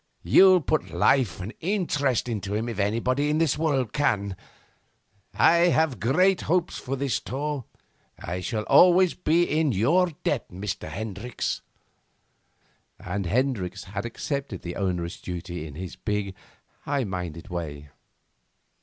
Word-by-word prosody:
You'll 185 Hz, -2 st, +6 dB
put 155 Hz, +1 st, -1 dB
life 125 Hz, -, +2 dB
and 100 Hz, +6 st, -6 dB
interest 160 Hz, -, 0 dB
into 105 Hz, -3 st, -3 dB
him 110 Hz, +2 st, -1 dB
if 115 Hz, -4 st, -5 dB
anybody 125 Hz, +8 st, +1 dB
in 150 Hz, -, +1 dB
this 160 Hz, -4 st, +2 dB
world 140 Hz, -7 st, 0 dB
can. 100 Hz, -9 st, 0 dB, 1.0 s
I 170 Hz, -, +5 dB
have 155 Hz, -, +1 dB
great 180 Hz, -, +3 dB
hopes 175 Hz, +1 st, 0 dB
of 135 Hz, +1 st, -1 dB
this 135 Hz, -4 st, 0 dB
tour. 145 Hz, -1 st, -4 dB, 0.5 s
I 90 Hz, +2 st, -4 dB
shall 110 Hz, +2 st, -2 dB
always 180 Hz, +6 st, +6 dB
be 170 Hz, 0 st, +2 dB
in 155 Hz, -4 st, +1 dB
your 160 Hz, -, +3 dB, 0.2 s
debt, 145 Hz, -, -1 dB
Mr. 95 Hz, -2 st, -5 dB
Hendricks.' 110 Hz, +6 st, -4 dB, 1.4 s
And 100 Hz, -3 st, -3 dB
Hendricks 100 Hz, -5 st, -1 dB
had 100 Hz, +3 st, -5 dB
accepted 135 Hz, -, -4 dB
the 85 Hz, 0 st, -5 dB
onerous 90 Hz, -3 st, -2 dB
duty 85 Hz, -2 st, -5 dB
in 70 Hz, -, -10 dB
his 90 Hz, +2 st, -7 dB
big, 105 Hz, -2 st, -2 dB, 0.5 s
high 140 Hz, -2 st, -1 dB
minded 90 Hz, -3 st, -5 dB
way. 75 Hz, -5 st, -5 dB
115 Hz, 135 wpm, -26 LUFS, 95-150 Hz, 1.4 s, You'll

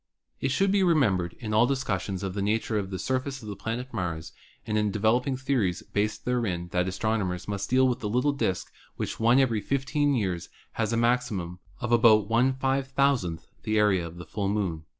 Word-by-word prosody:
It 135 Hz, -, 0 dB
should 195 Hz, +8 st, +2 dB
be 200 Hz, 0 st, +3 dB
remembered 105 Hz, -, +2 dB
in 110 Hz, -3 st, -5 dB
all 110 Hz, +3 st, +5 dB
discussions 100 Hz, -8 st, -2 dB
of 95 Hz, -2 st, -3 dB
the 100 Hz, -, -2 dB
nature 110 Hz, +1 st, 0 dB
of 95 Hz, -2 st, -4 dB
the 95 Hz, -, -4 dB
surface 130 Hz, +3 st, -2 dB
of -, -, -9 dB
the 100 Hz, -, -5 dB
planet 120 Hz, +5 st, -5 dB
Mars 85 Hz, -6 st, -3 dB, 0.3 s
and 105 Hz, -1 st, -2 dB
in 105 Hz, -1 st, +2 dB
developing 115 Hz, +6 st, +1 dB
theo 135 Hz, 0 st, 0 dB
ries 95 Hz, 0 st, -1 dB
based 105 Hz, +1 st, -2 dB
thereon 100 Hz, -9 st, -1 dB
that 90 Hz, 0 st, +1 dB
astronomers 95 Hz, -2 st, -1 dB
must 100 Hz, -1 st, -3 dB
deal 130 Hz, +1 st, +4 dB
with 125 Hz, -, -1 dB
a -, -, 0 dB
little 125 Hz, +7 st, +2 dB
disk 95 Hz, -9 st, -2 dB, 0.2 s
which -, -, -4 dB
once 120 Hz, +3 st, +5 dB
in 115 Hz, -5 st, +1 dB
fifteen 140 Hz, -, 0 dB
years 95 Hz, -7 st, -2 dB, 0.2 s
has 115 Hz, -1 st, -1 dB
a 115 Hz, -, +1 dB
maximum 115 Hz, -7 st, 0 dB, 0.2 s
of 120 Hz, -2 st, -2 dB
about 110 Hz, -3 st, +5 dB
Vuooo 130 Hz, -4 st, +1 dB, 0.2 s
the 110 Hz, 0 st, 0 dB
area 95 Hz, -5 st, +3 dB
of 85 Hz, +1 st, -11 dB
the 85 Hz, -, -8 dB
full 100 Hz, +3 st, -2 dB
Moon. 90 Hz, -7 st, -2 dB
110 Hz, 195 wpm, -27 LUFS, 95-130 Hz, 0.3 s, all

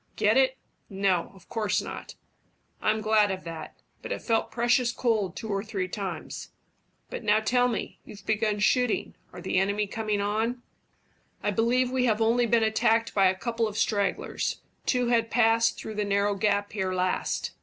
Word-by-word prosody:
"Get 210 Hz, +2 st, +3 dB
it? 265 Hz, 0 st, +3 dB, 0.3 s
No, 190 Hz, -3 st, 0 dB
of 185 Hz, -2 st, -18 dB
course 220 Hz, -3 st, 0 dB
not." -, -, -7 dB, 0.7 s
"I'm 215 Hz, 0 st, +1 dB
glad 215 Hz, -1 st, +3 dB
of 190 Hz, -1 st, -4 dB
that; 165 Hz, -1 st, -7 dB, 0.3 s
but -, -, -7 dB
it -, -, -3 dB
felt 225 Hz, -2 st, +1 dB
precious 240 Hz, +1 st, +2 dB
cold 220 Hz, -7 st, 0 dB
two 220 Hz, -, -6 dB
or 200 Hz, -1 st, -1 dB
three 200 Hz, -4 st, -3 dB
times. 185 Hz, -4 st, -5 dB, 0.6 s
But -, -, -5 dB
now 210 Hz, 0 st, +4 dB
tell 245 Hz, +3 st, +2 dB
me 245 Hz, -, -4 dB
you've 200 Hz, -1 st, -13 dB
begun 215 Hz, -1 st, +1 dB
shooting 250 Hz, +2 st, +2 dB, 0.2 s
are -, -, -9 dB
the 185 Hz, -, +1 dB
enemy 200 Hz, +2 st, +1 dB
coming 215 Hz, 0 st, -2 dB
on?" 220 Hz, +4 st, -1 dB, 0.8 s
"I 205 Hz, -, +1 dB
believe 245 Hz, +4 st, +2 dB
we 255 Hz, -1 st, +1 dB
have 220 Hz, -3 st, +2 dB
only 235 Hz, +2 st, +3 dB
been 230 Hz, 0 st, +3 dB
attacked 220 Hz, +1 st, +2 dB
by 195 Hz, -2 st, +5 dB
a 185 Hz, -, +2 dB
couple 230 Hz, +3 st, -1 dB
of 210 Hz, 0 st, -6 dB
stragglers 200 Hz, -4 st, -1 dB, 0.3 s
two 250 Hz, -2 st, +2 dB
who 235 Hz, -1 st, +5 dB
passed 225 Hz, 0 st, +2 dB
through 220 Hz, -, -6 dB
the 210 Hz, 0 st, -1 dB
narrow 200 Hz, 0 st, +1 dB
gap 205 Hz, 0 st, 0 dB
here 190 Hz, -3 st, -2 dB
last." 185 Hz, 0 st, -1 dB
215 Hz, 175 wpm, -27 LUFS, 200-230 Hz, 0.8 s, by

